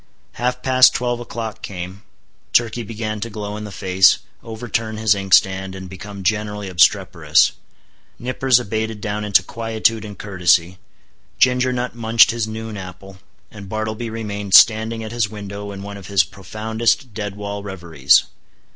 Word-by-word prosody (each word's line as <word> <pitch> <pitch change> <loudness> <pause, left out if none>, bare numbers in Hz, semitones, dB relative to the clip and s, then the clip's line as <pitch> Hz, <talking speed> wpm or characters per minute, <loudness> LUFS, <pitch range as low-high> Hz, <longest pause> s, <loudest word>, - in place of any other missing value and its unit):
Half 125 +1 -2
past 130 -1 +5
twelve 120 -1 -1
o'clock 115 -1 -6
came; 95 0 -7 0.5
Turkey 120 0 +2
began 110 -1 -5
to 115 - -4
glow 105 -1 -6
in 105 0 -6
the 105 - -8
face, 95 0 +4 0.2
overturn 110 -1 -4
his 110 -1 +3
inkstand, 95 -1 +2
and 95 -1 -8
become 100 +1 -9
generally 105 0 -2
obstreperous; 90 -2 +3 0.7
Nippers 125 0 +2
abated 110 -1 -3
down 105 0 -3
into 100 -3 +4
quietude 115 +1 -1
and 105 -2 -9
courtesy; 90 -2 +1 0.6
Ginger 125 0 +3
Nut 125 0 -3
munched 115 -1 +4
his 115 -1 -2
noon 110 -1 -6
apple; 95 +1 -10 0.3
and 100 -3 -11
Bartleby 110 +2 -3
remained 105 -3 -2
standing 110 0 +5
at 110 - -7
his 115 -3 0
window 100 -1 -7
in 100 0 -8
one 100 0 -7
of 100 -2 -11
his 100 -2 +3
profoundest 110 - -2
dead 105 -1 -5
wall 100 0 -5
reveries. 85 -8 +2
105 Hz, 150 wpm, -20 LUFS, 100-115 Hz, 0.7 s, past